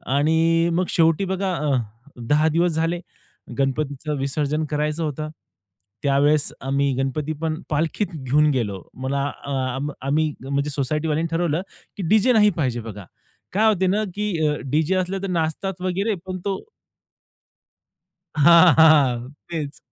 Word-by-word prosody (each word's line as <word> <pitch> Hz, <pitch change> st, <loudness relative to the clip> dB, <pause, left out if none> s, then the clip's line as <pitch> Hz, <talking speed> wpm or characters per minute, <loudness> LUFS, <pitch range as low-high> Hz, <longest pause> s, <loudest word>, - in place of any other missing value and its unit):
आणि 165 Hz, +3 st, +3 dB
मग 180 Hz, +2 st, +1 dB
शेवटी 165 Hz, +3 st, +2 dB
बघा 190 Hz, 0 st, -1 dB
अ, 150 Hz, -4 st, 0 dB, 0.5 s
10 150 Hz, +3 st, +3 dB
दिवस 170 Hz, +3 st, +2 dB
झाले, 165 Hz, +2 st, -1 dB, 0.6 s
गणपतीचं 140 Hz, +2 st, -1 dB
विसर्जन 145 Hz, +3 st, -1 dB
करायचं 150 Hz, +2 st, -1 dB
होतं. 155 Hz, 0 st, -3 dB, 0.7 s
त्यावेळेस 145 Hz, +1 st, +2 dB
आम्ही 140 Hz, +1 st, 0 dB
गणपती 140 Hz, +3 st, -2 dB
पण 160 Hz, -1 st, -2 dB
पालखीत 160 Hz, +7 st, 0 dB
घेऊन 150 Hz, +2 st, +2 dB
गेलो 105 Hz, -8 st, -2 dB, 0.2 s
मला 140 Hz, +1 st, -1 dB
आ 140 Hz, 0 st, -5 dB, 0.2 s
आ -, -, -3 dB, 0.3 s
आम्ही 155 Hz, +2 st, +1 dB
म्हणजे 140 Hz, +2 st, -1 dB
सोसायटीवाल्यांनी 150 Hz, +3 st, -1 dB
ठरवलं, 170 Hz, -1 st, 0 dB, 0.4 s
की 200 Hz, -, -4 dB
डीजे 220 Hz, +4 st, +4 dB
नाही 210 Hz, -2 st, +5 dB
पाहिजे 130 Hz, -6 st, 0 dB
बघा. 105 Hz, -3 st, -9 dB, 0.5 s
काय 215 Hz, +4 st, +3 dB
होते 190 Hz, -1 st, 0 dB
ना, 205 Hz, +4 st, +1 dB
की 210 Hz, +1 st, -1 dB, 0.2 s
अ, 150 Hz, -, +1 dB, 0.2 s
डीजे 160 Hz, +5 st, +2 dB
असले 185 Hz, +1 st, -1 dB
तर -, -, -1 dB
नाचतात 180 Hz, +2 st, -2 dB
वगैरे. 195 Hz, +4 st, 0 dB
पण 185 Hz, -1 st, -5 dB
तो 195 Hz, -1 st, -1 dB, 1.7 s
हां, 170 Hz, +2 st, +7 dB
हां, 140 Hz, -7 st, +5 dB, 0.2 s
तेच. 155 Hz, -4 st, -4 dB
155 Hz, 140 wpm, -22 LUFS, 140-175 Hz, 1.7 s, हां